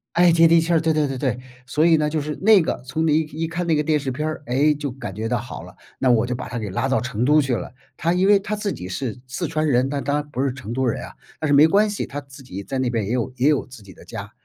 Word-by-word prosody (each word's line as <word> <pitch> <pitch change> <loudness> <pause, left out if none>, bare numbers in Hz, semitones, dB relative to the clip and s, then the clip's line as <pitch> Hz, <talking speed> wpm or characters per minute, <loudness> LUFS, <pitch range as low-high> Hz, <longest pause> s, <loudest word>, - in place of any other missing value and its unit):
哎， 175 0 +6
接 165 0 +6
地 165 0 +5
气 165 +1 -2
儿， 165 - +4
对 160 0 +1
对 150 -2 +1
对 135 -1 -4
对。 125 -2 -1 0.3
所 150 +6 +2
以 165 - +5
呢， 150 0 +1
就 155 0 -1
是 150 +1 -4
那 210 -1 +6
个， - - -2
从 160 +5 -1
你 155 +1 +4
一 - - +2 0.2
一 - - 0
看 175 +2 -3
那 165 - +2
个 150 - +2
电 150 0 +1
视 135 -2 -3
片 150 +4 -3
儿， 155 -1 -5
诶， 140 +5 +3
就 145 -2 -4
感 120 -7 -7
觉 110 +1 -3
到 120 -1 0
好 115 -7 -8
了， 90 +1 -13 0.2
那 130 -2 +3
我 115 0 +3
就 125 - -2
把 - - -6
他 120 0 -4
给 105 - -4
拉 95 +8 -1
到 135 - +1
成 125 -2 -2
都 150 +3 +5
去 135 -4 0
了。 - - -6 0.2
他 170 +2 +1
因 185 +2 +2
为 205 -1 +7
他 205 +2 -3
自 205 -1 -2
己 90 - -6
是 125 +5 -4
四 125 - -3
川 155 -1 -1
人， 130 0 +2
但 140 -2 -3
他 145 +2 0
不 140 -3 -4
是 135 -2 0
成 115 -4 -8
都 130 +2 0
人 115 - -1
啊， - - -9 0.3
但 155 - -1
是 145 - +2
没 145 +2 +8
关 205 +4 +3
系， 205 - -3
他 145 +1 -6
自 135 0 -14
己 100 -5 -7
在 135 +6 -4
那 130 -2 0
边 110 -5 -1
也 - - -3
有 125 0 -1
也 135 +5 +3
有 145 - +1
自 125 -4 -13
己 100 - -14
的 - - -16
家。 - - -8
140 Hz, 345 characters per minute, -22 LUFS, 125-160 Hz, 0.3 s, 没